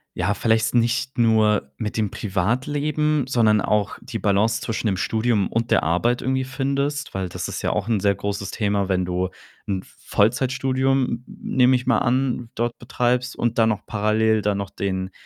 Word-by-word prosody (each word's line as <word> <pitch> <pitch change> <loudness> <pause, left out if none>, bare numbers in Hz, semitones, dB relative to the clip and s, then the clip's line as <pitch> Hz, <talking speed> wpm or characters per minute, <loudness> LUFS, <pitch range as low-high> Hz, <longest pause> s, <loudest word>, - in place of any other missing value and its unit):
ja, 90 +4 0
vielleicht 110 +2 +1
nicht 125 +2 +1
nur 110 -9 +3
mit 105 - -4
dem 105 -3 0
Privatleben, 140 +9 0
sondern 110 -5 +3
auch 105 -2 0
die 115 - -5
Balance 105 +3 +2
zwischen 115 0 -2
dem 95 - 0
Studium 110 +1 +1
und 115 +1 -1
der - - +4
Arbeit 90 +10 +1
irgendwie 130 0 0
findest? 140 +2 -2
Weil 95 -2 -3
das - - -4
ist - - -5
ja - - 0
auch - - -2
'n 110 -3 +2
sehr 100 -1 +2
großes 100 0 -4
Thema, 100 -3 0
wenn 90 -1 +1
du 90 +1 -1 0.4
'n 95 -2 -2 0.2
Vollzeitstudium, 130 +3 +1
n 125 - -23 0.2
nehme 130 0 +3
ich 125 0 -2
mal 120 - +4
an, 125 -1 0
dort 120 +1 -1
betreibst 125 +1 -1
und 120 0 0
dann 110 - +4
noch 105 -1 -2
parallel 110 +1 +1
dann 100 0 0
noch 100 -1 -5
den, 95 -1 -3
110 Hz, 180 wpm, -23 LUFS, 100-125 Hz, 0.4 s, der